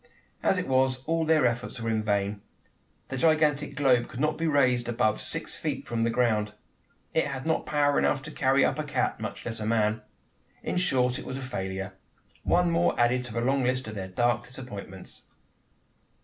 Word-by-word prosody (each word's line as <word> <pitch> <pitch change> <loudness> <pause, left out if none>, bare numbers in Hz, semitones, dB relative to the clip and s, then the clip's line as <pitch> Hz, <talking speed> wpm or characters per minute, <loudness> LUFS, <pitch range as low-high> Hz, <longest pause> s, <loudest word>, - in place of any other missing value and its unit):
As - - +3
it - - -2
was, 130 -1 +2
all 165 0 +1
their 155 -4 +4
efforts 120 +1 -1
were 115 0 -1
in 110 -1 +1
vain. 100 -1 -1 0.7
The 130 - -3
gigantic 150 -1 +2
globe 130 -4 +3
could 120 - -8
not 155 +2 +1
be 165 - -1
raised 125 -5 +2
above 110 -2 +1
six - - -4
feet - - -4
from 115 -1 -1
the 115 - +2
ground. 110 -3 +1 0.6
It 160 - +2
had 135 -2 -5
not 160 0 0
power 145 -1 +3
enough 135 -2 +1
to 150 - -7
carry 135 -1 +3
up - - 0
a - - 0
cat 145 - -1
much - - -6
less 115 -1 -4
a 105 - -3
man. 110 -1 +1 0.6
In - - -2
short, 125 -8 +1
it - - -8
was 130 - -4
a - - -6
failure 95 -6 -4 0.5
one 175 0 +2
more 170 +1 +2
added 120 +1 +3
to 120 - -8
the 115 - -1
long 135 +2 +2
list 130 0 0
of - - -7
their 95 -3 -5
dark 120 +5 +1
disappointments! 105 -7 -8
125 Hz, 195 wpm, -28 LUFS, 115-145 Hz, 0.7 s, their